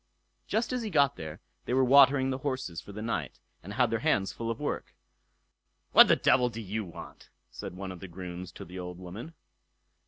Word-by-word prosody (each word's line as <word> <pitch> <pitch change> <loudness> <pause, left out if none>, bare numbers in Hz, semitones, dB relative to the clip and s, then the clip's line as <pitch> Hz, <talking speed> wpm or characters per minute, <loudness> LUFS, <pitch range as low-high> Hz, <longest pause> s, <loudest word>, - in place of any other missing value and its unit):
Just 230 +3 0
as 250 - -1
he 220 - -3
got 140 -5 +3
there 80 -1 -8 0.2
they 125 - 0
were 130 - +4
watering 135 0 +6
the 130 - -3
horses 130 - -3
for 100 - -11
the 105 +2 -6
night, 90 - -3 0.2
and - - -8
had - - +2
their - - +1
hands 95 0 +1
full 115 0 -4
of 115 - -3
work. - - -4 1.0
"What - - +9
the - - +6
devil 125 0 +3
do 115 - -7
you 110 +1 -3
want?" 85 -4 -11 0.2
said - - -7
one 95 0 -5
of 90 - -9
the 95 - -8
grooms 90 0 -7
to - - -9
the 90 +2 -8
old 90 -1 -6
woman. 100 - -9
110 Hz, 210 wpm, -29 LUFS, 90-130 Hz, 1.0 s, What